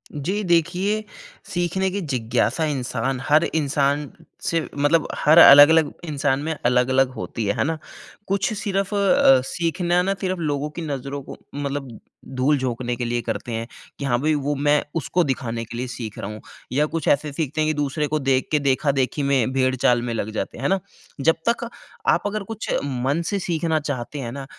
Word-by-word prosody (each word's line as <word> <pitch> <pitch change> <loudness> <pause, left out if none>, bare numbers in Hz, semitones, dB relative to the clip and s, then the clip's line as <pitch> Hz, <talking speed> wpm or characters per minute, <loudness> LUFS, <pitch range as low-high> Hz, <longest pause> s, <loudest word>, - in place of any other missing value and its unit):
जी 185 +9 -2
देखिए, 185 +4 +1 0.5
सीखने 175 +2 0
की 200 +1 -3
जिज्ञासा 125 0 0
इंसान 130 -2 -2
हर 155 +3 +5
इंसान 145 -1 0 0.3
से 165 -1 0 0.2
मतलब 145 +3 +2
हर 155 +3 +4
अलग-अलग 145 0 +9
इंसान 145 -3 0
में 160 0 -2
अलग-अलग 125 +2 +3
होती 115 -1 -5
है। 100 - 0
है - - +2
ना? 160 +2 -1 0.5
कुछ 195 +2 0
सिर्फ़ 195 0 -2
अ, 190 -9 +5
सीखना 175 +3 0
ना 195 +2 0
सिर्फ़ 185 -2 -1
लोगों 150 -2 -1
की 170 - -7
नज़रों 140 -2 -4
को - - -10 0.2
मतलब 140 -4 -4 0.4
धूल 140 +3 +2
झोंकने 125 -2 -2
के 120 - -3
लिए 120 0 -1
करते 115 +1 -4
हैं 115 +1 -3 0.3
कि 140 - -3
हाँ 120 -3 +1
भई, 155 +1 +2
वो 145 0 -1
मैं 145 +1 +2
उसको 170 +3 +1
दिखाने 120 -5 -2
के 115 +1 -8
लिए 125 +1 -3
सीख 120 -3 -7
रहा 100 - -4
हूँ 105 - -9 0.3
या 145 +4 +2
कुछ 160 0 -4
ऐसे 145 +1 +2
सीखते 155 0 -2
हैं 155 - +2
कि - - +1
दूसरे 145 +1 -1
को 155 +1 -1
देख 135 -2 +1
के, 150 - +3
देखा-देखी 140 0 +1
में 135 -3 +2
भेड़ 130 -1 +2
चाल 120 -1 +3
में 120 -1 -3
लग 110 -1 -3
जाते 110 - -4
हैं। - - -7
है - - +1
ना? 195 0 +2 0.4
जब 165 +4 +4
तक 235 0 -1 0.4
आप - - +3
अगर 210 0 -3
कुछ 220 +2 -6
मन 135 +3 -1
से 200 - -1
सीखना 165 -3 0
चाहते 145 -1 -4
हैं 120 -3 -4
ना, 135 +1 -6
145 Hz, 195 wpm, -22 LUFS, 130-165 Hz, 0.5 s, अलग-अलग